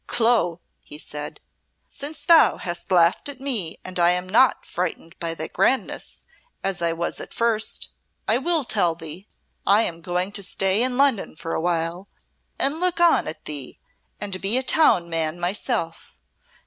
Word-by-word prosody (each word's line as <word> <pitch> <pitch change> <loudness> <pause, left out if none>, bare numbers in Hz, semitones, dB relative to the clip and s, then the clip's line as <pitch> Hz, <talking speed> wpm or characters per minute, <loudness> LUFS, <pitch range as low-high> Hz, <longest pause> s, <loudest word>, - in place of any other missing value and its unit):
"Clo," 225 -8 +2 0.2
he 150 - -8
said, 150 -1 -5 0.5
"since 290 +3 -6
thou 335 -2 +6
hast 175 +1 -5
laughed 175 +8 +3
at 275 -3 -8
me 235 -12 -1
and 185 -1 -3
I 170 0 +5
am 180 +1 0
not 235 +6 +3
frightened 165 -2 -4
by 165 -1 -3
thy 160 - -4
grandness, 225 +11 -1 0.4
as 195 -2 -1
I 170 -1 +2
was 170 +1 -3
at - - -8
first, 230 -2 -1 0.4
I 225 +3 +3
will 325 +2 +1
tell 180 -8 +1
thee. 165 +4 -8 0.4
I 205 +3 +5
am 170 -4 -2
going 180 +2 -1
to 205 - -2
stay 195 +1 +1
in 250 0 +1
Lunnon 275 - +2
for 165 +1 -5
awhile, 170 +2 -1 0.5
and 280 +4 0
look 360 -1 +1
on 345 -1 +4
at 155 - -6
thee, 145 -4 -5 0.4
and 195 -3 -3
be 200 +5 +2
a 260 - +1
town 255 - +4
man 165 0 -1
myself. 175 -2 -2
185 Hz, 165 wpm, -23 LUFS, 170-240 Hz, 0.5 s, thou